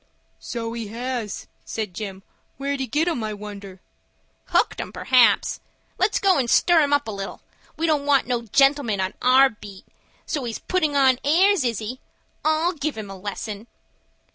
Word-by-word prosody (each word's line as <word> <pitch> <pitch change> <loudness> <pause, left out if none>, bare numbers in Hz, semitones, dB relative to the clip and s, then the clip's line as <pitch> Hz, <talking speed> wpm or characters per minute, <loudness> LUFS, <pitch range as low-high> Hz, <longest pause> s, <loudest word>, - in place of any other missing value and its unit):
"So 230 -2 -5
he 230 -2 -5
has," 235 -1 -4 0.2
said 215 -4 -4
Jim. 195 -1 -6 0.3
"Where'd 280 0 -2
he 265 - -2
get 300 +8 0
'em, 315 -10 -1
I 215 -1 -3
wonder?" 200 -2 -9 0.6
"Hooked - - +1
'em, - - -7
p'raps. 255 -2 +3 0.4
Let's 385 +3 +2
go 380 -6 +3
and 245 -3 0
stir 345 +5 +5
him 290 -1 +1
up 285 -2 +2
a - - -3
little. 195 -1 -6 0.4
We 325 - 0
don't 300 -3 +1
want 280 -2 +4
no 245 -1 -1
gentlemen 270 -2 +2
on 190 +1 -1
our 260 +2 +6
beat. 205 -3 -12 0.4
So 285 -5 -3
he's 230 -2 -4
puttin' 315 -6 -1
on 265 -2 +4
airs,—is 310 - +3
he? 225 +5 -5 0.4
I'll 315 +3 +2
give 300 -4 -3
him 205 -2 -6
a - - -7
lesson." 205 +2 -6
250 Hz, 170 wpm, -23 LUFS, 210-290 Hz, 0.6 s, our